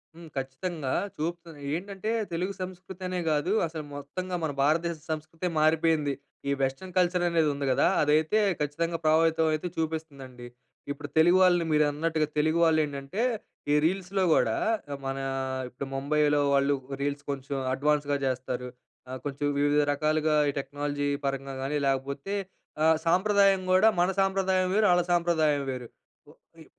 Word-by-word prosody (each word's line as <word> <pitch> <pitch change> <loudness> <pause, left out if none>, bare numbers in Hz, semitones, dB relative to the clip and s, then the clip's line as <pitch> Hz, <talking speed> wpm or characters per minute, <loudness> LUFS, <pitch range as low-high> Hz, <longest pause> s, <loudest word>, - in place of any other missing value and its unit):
హ్మ్, 170 0 -11
ఖచ్చితంగా 135 +2 -3 0.3
చూప్ 170 +3 -2 0.4
ఏంటంటే 195 +4 -5 0.2
తెలుగు 180 +4 -2
సంస్కృతి 185 0 -8
అనే 180 0 -2
కాదు, 150 +5 0 0.2
అసలు 160 -1 -6
మొత్తంగా 180 +6 -5
మన 155 - 0
భారతదేశ 165 +3 +1
సంస్కృతే 155 +3 -4
మారిపోయింది. 155 -2 +2 0.4
ఈ - - +2
వెస్టర్న్ 135 +8 -2
కల్చర్ 180 0 +2
అనేది 165 -3 +2
ఉంది 140 0 -3
కదా, 130 - +3 0.2
అదైతే 155 +7 +3 0.2
ఖచ్చితంగా 165 +3 -1
ప్రభావితం 160 +1 +3
అయితే 155 +3 -2
చూపిస్తుందండి. 140 -6 -5 0.4
ఇప్పుడు 145 0 -6
తెలుగు 175 +3 +6
వాళ్ళని, 175 -2 +4
మీరన్నట్టుగా 155 +1 +1
తెలుగు 155 +2 +2
వాళ్ళు 160 -1 +4
ఏంటంటే 140 +7 -5 0.5
ఈ - - +5
రీల్స్‌లో 190 +2 0
గూడా, 110 -6 +2 0.5
మన 135 0 -2 0.5
ఇప్పుడు 130 +2 -7
ముంబైలో 145 +1 +2
వాళ్ళు 140 +1 +3 0.3
రీల్స్ 140 0 -2
కొంచెం 140 0 -4 0.2
అడ్వాన్స్‌గా 145 +1 +1
చేస్తారు. 125 -1 -2 0.4
ఆహ్, 130 0 -5
కొంచెం 145 0 -3
వివిధ 145 +1 +3
రకాలుగా 155 +1 +1 0.2
ఈ - - -16
టెక్నాలజీ 145 +1 -3 0.2
పరంగా 135 0 -3
కానీ, 145 +2 -1
లేకపోతే 140 +7 -2 0.5
ఆహ్, 160 0 +5
సాంప్రదాయం 195 +2 +4
గూడా 185 +4 +6
మన 180 - +3
సాంప్రదాయం 190 -1 +1
వేరు, 215 0 +4
ఆళ్ళ 175 0 +4
సాంప్రదాయం 160 -4 +2
వేరు. 125 -2 -6 0.4
వ - - -15 0.3
ఇ - - -13
155 Hz, 140 wpm, -28 LUFS, 140-175 Hz, 0.5 s, తెలుగు